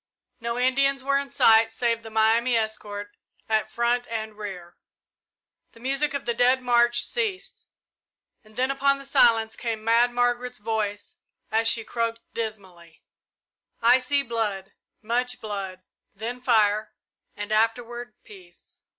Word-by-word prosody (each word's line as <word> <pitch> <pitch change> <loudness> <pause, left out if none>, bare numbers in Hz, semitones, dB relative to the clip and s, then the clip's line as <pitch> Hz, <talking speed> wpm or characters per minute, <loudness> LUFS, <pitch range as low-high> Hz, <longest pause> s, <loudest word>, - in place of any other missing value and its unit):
No 235 +1 -3
Indians 270 +2 +2
were 275 +1 +2
in 280 0 -6
sight 225 -2 +5
save 230 0 -1
the 225 - -10
Miami 225 +3 +3
escort 205 -2 -4 0.3
at 220 -1 0
front 240 +1 0
and 220 -1 -5
rear. 190 -5 -8 1.0
The - - -16
music 275 +4 -1
of 280 - -4
the 240 - 0
Dead 250 +2 +3
March 240 -1 +3
ceased, 435 -6 -4 0.8
and 215 0 -21
then 260 +2 +1
upon 275 0 +2
the 275 - -10
silence 225 -4 +3
came 225 -2 -4
Mad 230 +2 +3
Margaret's 245 0 0
voice, 210 -1 -3 0.3
as 225 +1 +2
she 225 0 +4
croaked 230 0 -3
dismally, 190 -7 -7 0.8
"I 240 +2 +5
see 280 +2 +1
blood 215 -5 -3 0.3
much 245 +3 -1
blood, 195 -3 -6 0.3
then 235 +5 -5
fire, 215 -3 +2 0.4
and 205 0 -6
afterward 230 +1 -1
peace." 180 -4 -17
230 Hz, 135 wpm, -25 LUFS, 215-245 Hz, 1.0 s, sight